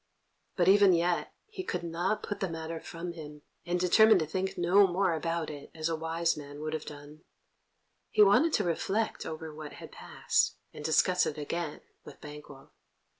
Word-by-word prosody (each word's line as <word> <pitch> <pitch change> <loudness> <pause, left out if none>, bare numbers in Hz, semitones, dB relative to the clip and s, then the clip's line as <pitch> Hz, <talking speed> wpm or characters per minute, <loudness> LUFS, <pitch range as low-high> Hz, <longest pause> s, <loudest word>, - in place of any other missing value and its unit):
But 175 -1 +2
even 200 -1 +6
yet 175 +1 0
he 425 -3 -7
could 180 - -3
not 175 +5 -2
put 205 - -4
the 190 - -1
matter 165 0 -5
from 170 +2 -7
him, 150 -3 -10 0.2
and 175 +1 0
determine 220 +4 +6
to 160 - 0
think 190 +4 -3
no 190 +3 +5
more 185 0 +1
about 165 0 -2
it, 145 -1 -10
as 160 0 -2
a 165 - 0
wise 165 +1 0
man 145 -1 -9
would 155 0 -4
have 155 -1 -4
done. 145 +1 -11 0.9
He 210 - +5
wanted 210 +12 +5
to 210 - +2
reflect 195 +5 -1
over 160 0 -6
what 150 -1 -9
had - - -11
passed, - - 0 0.2
and 150 - -9
discuss 180 +4 +3
it 155 - -4
again 150 +1 -4 0.2
with - - -13
Banquo. 150 -2 -12
170 Hz, 180 wpm, -30 LUFS, 155-185 Hz, 0.9 s, even